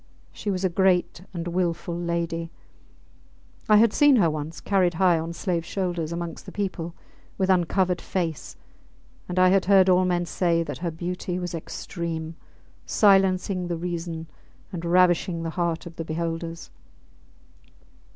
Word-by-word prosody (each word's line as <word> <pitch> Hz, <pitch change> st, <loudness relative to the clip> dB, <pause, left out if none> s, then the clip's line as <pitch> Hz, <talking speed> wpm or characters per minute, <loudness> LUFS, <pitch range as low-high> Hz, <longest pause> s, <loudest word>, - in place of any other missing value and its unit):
She 210 Hz, -, -5 dB
was 190 Hz, -1 st, -1 dB
a -, -, +3 dB
great 180 Hz, -1 st, +2 dB
and 170 Hz, -2 st, -5 dB
wilful 170 Hz, -1 st, -1 dB
lady: 170 Hz, -1 st, -2 dB, 1.2 s
I 210 Hz, -, +7 dB
had 225 Hz, 0 st, +5 dB
seen 290 Hz, -2 st, +6 dB
her 175 Hz, -9 st, +4 dB
once 155 Hz, +1 st, -5 dB
carried 185 Hz, -4 st, +1 dB
high 175 Hz, -1 st, +4 dB
on 165 Hz, +1 st, -4 dB
slaves 170 Hz, -1 st, -2 dB
shoulders 175 Hz, -4 st, -2 dB
amongst 170 Hz, -1 st, -5 dB
the -, -, -7 dB
people, 180 Hz, -4 st, -4 dB, 0.4 s
with 190 Hz, -1 st, +2 dB
uncovered 180 Hz, 0 st, +1 dB
face, 165 Hz, -5 st, -3 dB, 0.7 s
and 180 Hz, -, -4 dB
I 185 Hz, 0 st, +6 dB
had 190 Hz, 0 st, +3 dB
heard 190 Hz, -1 st, +5 dB
all 185 Hz, 0 st, +4 dB
men 175 Hz, -1 st, +1 dB
say 170 Hz, 0 st, +1 dB
that -, -, -6 dB
her 170 Hz, 0 st, -2 dB
beauty 180 Hz, +2 st, -4 dB
was 180 Hz, -1 st, -4 dB
extreme, 165 Hz, 0 st, -5 dB, 0.5 s
silencing 190 Hz, -2 st, +3 dB
the 170 Hz, -1 st, -2 dB
reason 170 Hz, -1 st, -4 dB, 0.5 s
and 170 Hz, -2 st, -5 dB
ravishing 175 Hz, -1 st, +3 dB
the 165 Hz, -, -3 dB
heart 170 Hz, -1 st, -2 dB
of 170 Hz, -1 st, -10 dB
the 165 Hz, -, -3 dB
beholders. 165 Hz, +1 st, -4 dB
175 Hz, 150 wpm, -25 LUFS, 165-185 Hz, 1.2 s, I